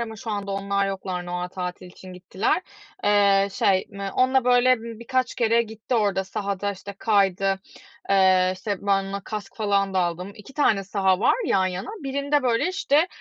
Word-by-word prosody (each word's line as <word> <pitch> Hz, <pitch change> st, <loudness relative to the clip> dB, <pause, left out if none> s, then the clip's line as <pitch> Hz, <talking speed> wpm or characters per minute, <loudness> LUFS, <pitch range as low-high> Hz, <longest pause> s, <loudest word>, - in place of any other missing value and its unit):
ama 225 Hz, -1 st, -5 dB
şu 220 Hz, +2 st, -6 dB
anda 200 Hz, -1 st, -3 dB
onlar 200 Hz, 0 st, 0 dB
yoklar, 185 Hz, -2 st, -4 dB
Noel 180 Hz, 0 st, -3 dB
tatili 180 Hz, 0 st, -6 dB
için 185 Hz, +1 st, -12 dB
gittiler. 190 Hz, -, -1 dB, 0.4 s
Eee, 200 Hz, -1 st, +4 dB
şey, 190 Hz, -1 st, +2 dB
m 200 Hz, 0 st, -5 dB
onunla, 260 Hz, 0 st, +2 dB
böyle, 250 Hz, 0 st, +5 dB
ımm, 230 Hz, -1 st, -8 dB
birkaç 255 Hz, +1 st, -1 dB
kere 235 Hz, 0 st, +3 dB
gitti 220 Hz, +2 st, -5 dB
orada 200 Hz, -4 st, +1 dB
sahada, 200 Hz, +1 st, -3 dB
işte, 200 Hz, +1 st, -9 dB
kaydı. 195 Hz, -2 st, +2 dB, 0.5 s
Eee, 185 Hz, -1 st, +4 dB
işte, 200 Hz, +2 st, -3 dB
ben 195 Hz, -1 st, +2 dB
ona 195 Hz, +1 st, -5 dB
kask 210 Hz, -2 st, -6 dB
falan 200 Hz, -3 st, 0 dB
da -, -, +2 dB
aldım. 180 Hz, +2 st, -2 dB
2 210 Hz, +6 st, -13 dB
tane 210 Hz, -9 st, +2 dB
saha 190 Hz, -1 st, +1 dB
var -, -, +4 dB
yan 190 Hz, -9 st, +2 dB
yana 185 Hz, 0 st, -4 dB
birinde, 280 Hz, +1 st, 0 dB
böyle, 245 Hz, +6 st, +1 dB
işte, 340 Hz, -4 st, +2 dB
200 Hz, 175 wpm, -24 LUFS, 190-230 Hz, 0.5 s, böyle